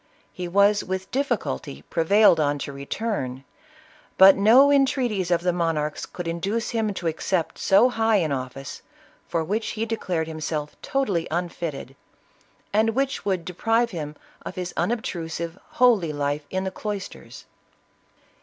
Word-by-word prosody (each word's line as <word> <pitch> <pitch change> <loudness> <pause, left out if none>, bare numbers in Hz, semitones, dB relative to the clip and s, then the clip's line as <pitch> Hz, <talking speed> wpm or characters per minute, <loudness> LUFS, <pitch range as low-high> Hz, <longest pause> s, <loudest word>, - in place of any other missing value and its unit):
He 180 -1 -5
was 200 +3 +3
with 190 0 -4
difficulty 235 - -2
prevailed 175 +1 +4
on 145 -1 +1
to 140 - -7
return, 140 - -4 0.7
but 190 0 +9
no 245 +8 +6
entreaties 260 -9 +2
of 170 -1 +2
the 180 0 +1
monarchs 160 -3 -1
could 175 -2 -7
induce 195 +7 -2
him 225 -3 0
to 180 - -6
accept 165 +1 -1
so 195 +6 +5
high 225 -2 +1
an 165 -7 +1
office, 135 0 -5 0.5
for 165 -1 -1
which 210 +7 -2
he 220 +1 -2
declared 185 -7 -2
himself 155 -1 -4
totally 205 -12 -1
unfitted, 165 -5 -4 0.8
and 220 +1 +2
which 270 0 -1
would 185 -4 -1
de 180 - -6
prive 225 +5 +1
him 150 -4 -5 0.3
of - - -7
his 180 -1 -4
unobtrusive, 170 -7 -3 0.2
holy 230 -10 +4
life 145 0 -2
in 185 0 -2
the 190 - -3
cloisters. 205 0 -7
185 Hz, 145 wpm, -24 LUFS, 160-220 Hz, 0.8 s, but